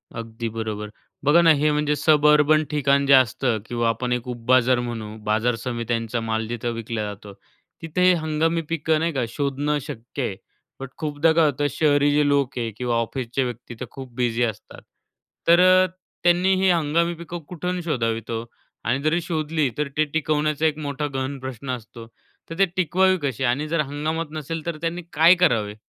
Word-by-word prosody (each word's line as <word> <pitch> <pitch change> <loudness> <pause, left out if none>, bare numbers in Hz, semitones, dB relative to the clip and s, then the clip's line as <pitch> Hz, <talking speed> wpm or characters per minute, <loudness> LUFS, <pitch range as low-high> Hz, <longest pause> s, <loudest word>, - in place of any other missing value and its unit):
अगदी 115 0 -5
बरोबर. 110 -1 -5 0.4
बघा 150 +4 +6
ना 165 -1 +6
हे 150 +1 +2
म्हणजे 150 0 +1
सबअर्बन 150 0 +4
ठिकाण 140 -1 +2
जे 140 - +5
असतं 130 -2 +3
किंवा 120 0 0
आपण 125 +2 -2
एक 125 0 -3
उपबाजार 125 +1 +2
म्हणू 115 -3 -5
बाजार 110 +3 +1
समित्यांचा 115 -1 -3
माल 110 0 -2
जिथं 120 +1 -3
विकला 115 -1 -4
जातो, 105 -1 -8 0.5
तिथं 165 +2 -3
हे 180 0 +6
हंगामी 160 0 0
पिकं 160 -1 +1
नाही 165 0 -1
का, 130 -3 0
शोधणं 145 +2 -1
शक्य 120 +4 -6
आहे. 100 - -2 0.4
बट 135 - -6
खूपदा 155 +1 +1
काय 165 0 +4
होतं 145 0 +1
शहरी 145 0 +3
जे 145 0 +3
लोक 140 -3 +1
आहे 115 -2 -2
किंवा 125 -1 -1
ऑफिसचे 120 +2 -2
व्यक्ती 120 0 -6
तर 125 - -4
खूप 130 -3 -10
बिझी 120 -1 0
असतात, 110 -2 -5 0.7
तर 170 +1 +6
अ, 185 0 +6 0.4
त्यांनी 175 +2 +4
हे 190 - +4
हंगामी 170 +1 +1
पिकं 170 +1 -7
कुठून 180 +1 -3
शोधावीत 115 -8 -2
हो? 115 0 -3 0.4
आणि 130 +4 0
जरी 160 +3 +1
शोधली 155 -3 -1
तर 150 -1 0
ते 155 - +3
टिकवण्याचा 155 0 0
एक 155 -1 +1
मोठा 145 0 -3
गहन 135 +1 -3
प्रश्न 130 0 -7
असतो. 115 -1 -8 0.4
तर 165 - -7
ते 195 - +6
टिकवावी 185 +2 +2
कशी 135 -2 -2
आणि 135 +5 0
जर 165 0 -1
हंगामात 155 +3 -3
नसेल, 155 +1 -5
तर 170 -2 -3
त्यांनी 170 +1 -2
काय 165 +4 +6
करावे? 115 -13 +1
140 Hz, 180 wpm, -23 LUFS, 120-160 Hz, 0.7 s, बघा